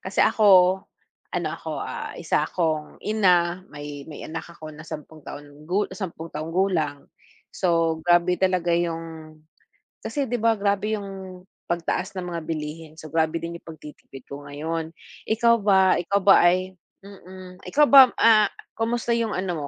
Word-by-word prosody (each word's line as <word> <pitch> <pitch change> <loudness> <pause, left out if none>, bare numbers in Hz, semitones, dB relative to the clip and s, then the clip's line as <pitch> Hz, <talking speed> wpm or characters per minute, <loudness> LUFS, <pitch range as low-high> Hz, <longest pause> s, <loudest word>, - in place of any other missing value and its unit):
kasi - - -1
ako 190 -3 +5 0.5
ano - - -1
ako, - - -7
ah, - - -5
isa - - +1
akong 155 -4 -2
ina, 180 -4 +2
may 145 -1 -8
may 150 - -9
anak 160 +1 -6
ako 155 -2 -10
na 155 +1 -12
10 155 -1 -10
taon 145 +1 -11
gu 190 +5 0
10 165 -4 -6
taong 155 +2 -5
gulang. 170 -7 -1 0.4
So, 165 -3 +1
grabe 175 +1 +3
talaga 185 -2 +1
yung 165 -2 -5 0.7
kasi 280 -3 -2
di 245 - -2
ba 225 +1 +3
grabe 205 +2 0
yung 190 -2 -8 0.2
pagtaas 175 +2 -2
ng 180 -1 -4
mga 170 - -4
bilihin. 155 0 -5
So, 155 -2 -11
grabe 160 +1 0
din 170 0 -5
yung - - -37
pagtitipid 150 -4 -12
ko 140 +1 -9
ngayon. 160 +3 -4 0.4
Ikaw 235 +2 +3
ba 190 -2 +4
ikaw 200 +3 0
ba 195 - +7 0.2
ay 185 +1 -2 0.3
mm. 185 -2 -12
Ikaw 295 +1 +3
ba, 270 -3 +9
ah, 215 -2 +6 0.3
kamusta 235 +1 -1
yung 230 -2 -1
ano, 175 -5 -3
175 Hz, 155 wpm, -24 LUFS, 160-195 Hz, 0.7 s, ba